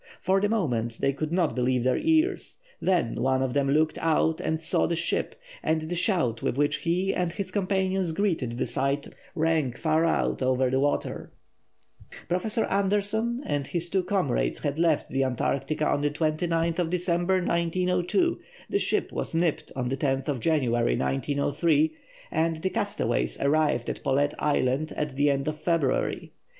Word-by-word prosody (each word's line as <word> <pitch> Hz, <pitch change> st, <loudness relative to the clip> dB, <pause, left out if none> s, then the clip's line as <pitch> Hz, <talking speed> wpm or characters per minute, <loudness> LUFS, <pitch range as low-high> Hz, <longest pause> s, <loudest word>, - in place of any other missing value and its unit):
For 190 Hz, +1 st, +2 dB
the 205 Hz, -, +2 dB
moment 120 Hz, -, -1 dB
they 140 Hz, -, +1 dB
could 155 Hz, +3 st, -4 dB
not 175 Hz, -2 st, +1 dB
believe 125 Hz, -1 st, +1 dB
their 130 Hz, 0 st, +2 dB
ears. 325 Hz, +4 st, +1 dB, 0.2 s
Then 180 Hz, -11 st, +1 dB
one 130 Hz, +1 st, +1 dB
of 130 Hz, -2 st, -2 dB
them 140 Hz, -1 st, +1 dB
looked 155 Hz, +2 st, +2 dB
out 160 Hz, 0 st, +1 dB
and 160 Hz, 0 st, -1 dB
saw 160 Hz, -, +2 dB
the 170 Hz, -, 0 dB
ship, 165 Hz, -, -1 dB, 0.3 s
and 160 Hz, 0 st, +1 dB
the 160 Hz, +3 st, -4 dB
shout 170 Hz, -, +1 dB
with 120 Hz, -, -1 dB
which 145 Hz, 0 st, +2 dB
he 180 Hz, +3 st, 0 dB
and 180 Hz, -2 st, -1 dB
his 190 Hz, 0 st, -5 dB
companions 190 Hz, -2 st, 0 dB
greeted 160 Hz, -, -1 dB
the -, -, 0 dB
sight 140 Hz, +1 st, -1 dB, 0.3 s
rang 160 Hz, -5 st, +1 dB
far 160 Hz, +4 st, +1 dB
out 165 Hz, -, +1 dB
over 130 Hz, 0 st, +2 dB
the 130 Hz, -, +2 dB
water. 145 Hz, +1 st, -1 dB, 1.0 s
Professor 215 Hz, +6 st, 0 dB
Andersson 205 Hz, +5 st, 0 dB
and 145 Hz, -2 st, -2 dB
his 170 Hz, 0 st, -3 dB
two 190 Hz, -, +2 dB
comrades 175 Hz, -, 0 dB
had 145 Hz, +1 st, -1 dB
left 165 Hz, -3 st, +2 dB
the 135 Hz, +1 st, +1 dB
Antarctica 135 Hz, +4 st, -1 dB
on 145 Hz, -, +1 dB
December 155 Hz, +3 st, 0 dB, 0.2 s
29, 170 Hz, -, 0 dB
1902; 180 Hz, -, +1 dB, 0.3 s
the 400 Hz, -, +2 dB
ship -, -, 0 dB
was -, -, -3 dB
nipped 165 Hz, -2 st, 0 dB
on 130 Hz, -2 st, -2 dB
January 135 Hz, -, 0 dB
10, -, -, -3 dB
1903; 145 Hz, -, +1 dB, 0.4 s
and 160 Hz, 0 st, 0 dB
the 190 Hz, -, 0 dB
castaways 60 Hz, -, -1 dB
arrived 145 Hz, -4 st, +1 dB
at -, -, -4 dB
Paulet 140 Hz, +1 st, +1 dB
Island 145 Hz, +1 st, 0 dB
at 150 Hz, -3 st, -3 dB
the 145 Hz, +1 st, +3 dB
end 140 Hz, 0 st, 0 dB
of 155 Hz, 0 st, -3 dB
February. 155 Hz, -5 st, 0 dB
155 Hz, 160 wpm, -26 LUFS, 135-180 Hz, 1.0 s, the